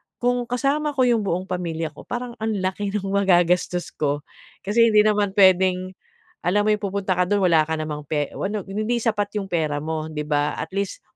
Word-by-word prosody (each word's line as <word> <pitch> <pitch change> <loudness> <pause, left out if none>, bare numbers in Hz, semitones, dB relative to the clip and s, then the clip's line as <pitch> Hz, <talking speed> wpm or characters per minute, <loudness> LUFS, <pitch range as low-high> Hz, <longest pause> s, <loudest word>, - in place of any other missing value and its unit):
Kung 245 0 0
kasama 280 +4 0
ko 260 - +3
'yong 230 -5 +2
buong 180 0 0
pamilya 170 -4 -3
ko 150 - -14
parang 245 -1 -5
ang 220 0 -1
laki 190 +1 -2
ng 205 - -1
magagastos 180 -2 +2
ko." 145 -1 -2 0.4
Kasi 230 +4 +4
hindi 210 - +7
naman 205 -2 +1
pwedeng, 185 -1 +4 0.5
alam 205 +4 +2
mo - - +4
'yong 210 0 -1
pupunta 195 -2 -1
ka 180 - +3
do'n 205 +2 +1
wala 165 -4 +4
ka 160 - -3
namang 150 -1 -5
pe 145 0 -1
o - - -2
ano, 210 +1 -2
hindi 215 +4 -1
sapat 210 -3 -1
'yong 195 -1 -6
pera 155 -4 -1
mo, 155 0 -3
'di 150 -1 -3
ba? 145 0 +1
At - - -4
least, 200 -1 -3
195 Hz, 205 wpm, -23 LUFS, 170-215 Hz, 0.5 s, hindi